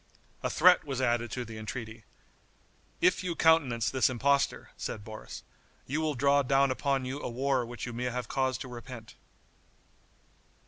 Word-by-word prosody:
A - - -1
threat 180 -1 +5
was 135 -4 -4
added 120 -2 +1
to 125 +2 -4
the 110 0 -8
entreaty: 110 0 -7 1.0
"If 180 +1 +3
you 175 -2 -2
countenance 145 -10 +3
this 130 -1 +3
impostor," 140 +3 +1
said 105 - -5
Boris, 110 +1 -9 0.4
"you 145 +4 -2
will 155 -2 0
draw 140 +2 +4
down 135 0 +3
upon 135 0 0
you 135 +3 -4
a - - -3
war 130 +1 0
which 120 0 -6
you 120 - -6
may 120 +2 -3
have 125 -1 -3
cause 130 -1 0
to - - -7
repent." 120 -2 -9
130 Hz, 165 wpm, -30 LUFS, 120-140 Hz, 1.0 s, threat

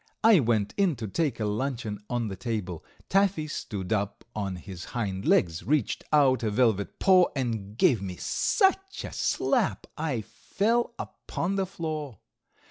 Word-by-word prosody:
I 220 -4 +7
went 110 -5 +1
in 195 -6 +3
to 115 -3 -5
take 135 - -1
a 110 - 0
luncheon 110 -1 -2
on 120 -2 -1
the 95 - -4
table. 95 -6 -4 0.2
Taffy 195 -5 +2
stood 105 -9 -4
up 100 -1 -2
on 100 -3 -2
his 90 0 -8
hind 95 -4 -2
legs, 85 -2 +3
reached 145 -4 0
out 140 -4 +4
a 110 - 0
velvet 105 -2 +1
paw, 185 -2 +6
and 110 -6 -3
gave 120 -4 +4
me 95 -2 -5
such 385 - +1
a - - -7
slap - - 0
I 150 -7 -1
fell 230 - -1
upon 185 +4 -4
the 195 -1 0
floor. 155 - -5
120 Hz, 155 wpm, -27 LUFS, 105-160 Hz, 0.2 s, I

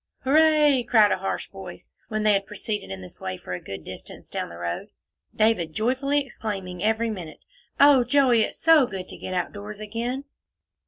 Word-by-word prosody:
"Hooray!" 300 -1 +5
cried 220 -3 +4
a - - +1
harsh - - -3
voice, - - -11
when 215 -1 -2
they 210 -1 +5
had 195 0 0
proceeded 210 - -4
in 95 -1 -6
this 90 - -12
way 95 -1 -4
for 90 - -7
a 90 - -4
good 95 -5 -8
distance - - -10
down - - -4
the 85 - -10
road, 85 +1 -4 0.5
David 215 -8 +2
joyfully 275 - +1
exclaiming 195 -7 -5
every 225 +1 +1
minute, 175 -7 -8 0.3
"Oh, 280 -3 +7
Joey, 255 -3 +4
it's - - -1
so 320 -5 +5
good 190 -3 -6
to - - -9
get 185 - -5
out 180 -1 -1
doors 205 0 -8
again." 235 +5 -3
215 Hz, 190 wpm, -25 LUFS, 185-260 Hz, 0.5 s, Oh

